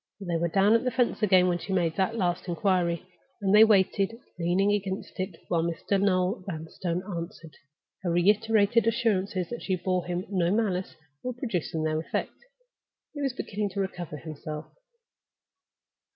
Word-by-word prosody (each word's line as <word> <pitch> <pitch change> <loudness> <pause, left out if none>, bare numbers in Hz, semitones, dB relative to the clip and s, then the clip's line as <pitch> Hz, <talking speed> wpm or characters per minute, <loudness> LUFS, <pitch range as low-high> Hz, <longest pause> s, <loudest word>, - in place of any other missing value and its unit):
They 175 -4 -2
were 170 +1 +1
down 195 +5 +4
at 230 - +3
the 255 - +1
fence 245 -1 0
again 185 -3 +5
as 175 - -3
she 195 - -4
made 170 -3 +1
that 195 +4 0
last 175 -3 -1
inquiry, 175 0 +1 0.3
and 195 -2 +1
they 210 +1 +9
waited, 200 0 +3 0.2
leaning 180 +4 +2
against 195 -2 -3
it, 185 -1 -3
while 170 -2 +1 0.3
Noel 190 0 +2
Vanstone 170 +1 -3
answered. 170 -4 -7 0.5
Her 180 - -2
reiterated 210 +5 +3
assurances 205 -6 +1
that 240 - -4
she 190 - 0
bore 180 0 -1
him 180 +1 -2
no 185 -4 +1
malice 190 -3 0 0.3
were 250 - -3
producing 185 - -2
their 155 0 0
effect; 160 - -3 0.8
he 290 - -5
was 270 -3 0
beginning 210 -4 -3
to - - -1
recover 175 -5 -4
himself. 155 0 -7
190 Hz, 155 wpm, -28 LUFS, 175-205 Hz, 0.8 s, they